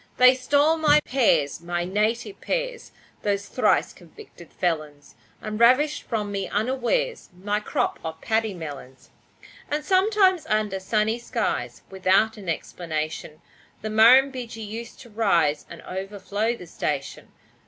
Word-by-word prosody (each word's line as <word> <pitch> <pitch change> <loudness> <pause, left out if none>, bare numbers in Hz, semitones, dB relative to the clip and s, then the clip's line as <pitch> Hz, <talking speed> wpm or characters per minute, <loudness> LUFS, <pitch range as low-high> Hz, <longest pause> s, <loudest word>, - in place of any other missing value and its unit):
They 255 0 +8
stole 285 +5 +2
my 300 -2 +5
pears 170 - +2
my 175 0 -2
native 215 - -1
pears - - -3 0.3
Those 200 -1 -1
thrice - - +1
convicted 285 - -15
felons, 155 -5 -3 0.3
And 215 0 -4
ravished 260 +6 +4
from 210 -3 -3
me 195 -1 -3
unawares 260 - -1
My 205 +2 -1
crop 210 - -2
of 160 0 -6
paddy 220 -1 0
melons. 145 -5 -9 0.6
And 300 +1 -2
sometimes 380 -1 +3
under 215 -2 0
sunny 215 +4 0
skies, 125 - -3
Without 190 +3 +2
an 200 -5 -8
explanation, 155 -1 -4 0.4
The 215 - -3
Murrumbidgee 245 +1 +4
used 225 +3 -8
to 235 - -14
rise 170 -9 +1
And 170 - -11
overflow 200 +4 -3
the 180 - -10
station. 165 - -4
215 Hz, 130 wpm, -24 LUFS, 180-255 Hz, 0.6 s, They